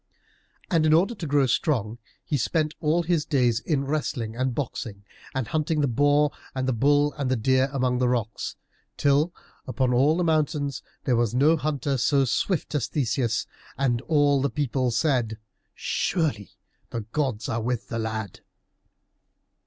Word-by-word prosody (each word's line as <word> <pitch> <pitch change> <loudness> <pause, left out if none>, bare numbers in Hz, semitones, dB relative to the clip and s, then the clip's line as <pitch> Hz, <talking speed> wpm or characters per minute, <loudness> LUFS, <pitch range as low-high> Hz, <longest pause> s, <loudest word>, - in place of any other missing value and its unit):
And 165 -3 +3
in 155 - +4
order 185 +8 +3
to 170 -8 -6
grow 140 -1 +3
strong 120 - 0 0.3
he 150 - -1
spent 155 +3 0
all 160 +2 +1
his 165 -2 +1
days 125 -7 +2
in 140 -1 -1
wrestling 130 -6 -2
and 130 0 -1
boxing, 110 -7 -4 0.3
and 130 -4 -1
hunting 155 0 0
the 145 - +2
boar 145 +4 +3 0.2
and 130 0 -1
the 130 - +2
bull 145 +4 +3
and 135 -3 0
the 130 - +2
deer 130 +3 +2
among 125 -2 0
rocks, 120 -3 -1 0.4
till 145 +4 +3 0.4
upon 130 -1 0
all 140 +6 +4
the 180 - +1
mountains 150 -4 0 0.2
there 125 - +2
was 120 -1 +1
no 150 +6 +5
hunter 145 -3 -1
so 135 +2 +3
swift 155 +8 -1
as 135 -6 0
Theseus, 120 -4 0 0.3
and 125 -4 +1
all 145 -3 +3
the 140 - +1
people 135 -3 0
said, 120 -4 0 0.4
"Surely 150 - -1 0.4
the 115 - -4
gods 115 0 -2
are 115 - -1
with 120 +1 -2
the 115 - -3
lad!" 110 -3 -4
135 Hz, 160 wpm, -25 LUFS, 120-150 Hz, 0.4 s, no